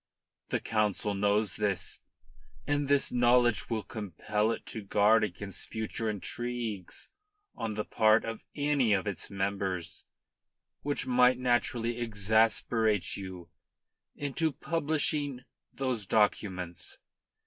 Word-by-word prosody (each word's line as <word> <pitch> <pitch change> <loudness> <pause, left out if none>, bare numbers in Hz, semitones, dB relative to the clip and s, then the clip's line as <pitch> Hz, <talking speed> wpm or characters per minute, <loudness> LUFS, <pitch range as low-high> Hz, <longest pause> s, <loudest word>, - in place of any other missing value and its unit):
The - - 0
Council 105 -2 0
knows 105 +1 +1
this, 100 -4 -2 0.7
and 145 -1 0
this 140 0 +3
knowledge 120 -3 +3
will 110 -3 -1
compel 105 +1 -2
it 115 - -3
to 110 - -5
guard 105 +2 +4
against 100 -1 -3
further 110 0 -2
intrigues 110 -1 -4 0.4
on 110 -2 -4
the 105 - -2
part 110 0 +4
of 115 0 -5
any 145 -6 +2
of 95 0 +1
its 100 -3 -4
members 95 -2 -2 0.7
which 145 0 -1
might 125 0 +4
naturally 120 -1 0
exasperate 110 -1 +2
you 95 -3 -8 0.6
into 145 +3 0
publishing 145 -2 0 0.3
those 125 -7 -2
documents. 95 -5 0
110 Hz, 110 wpm, -30 LUFS, 100-125 Hz, 0.7 s, guard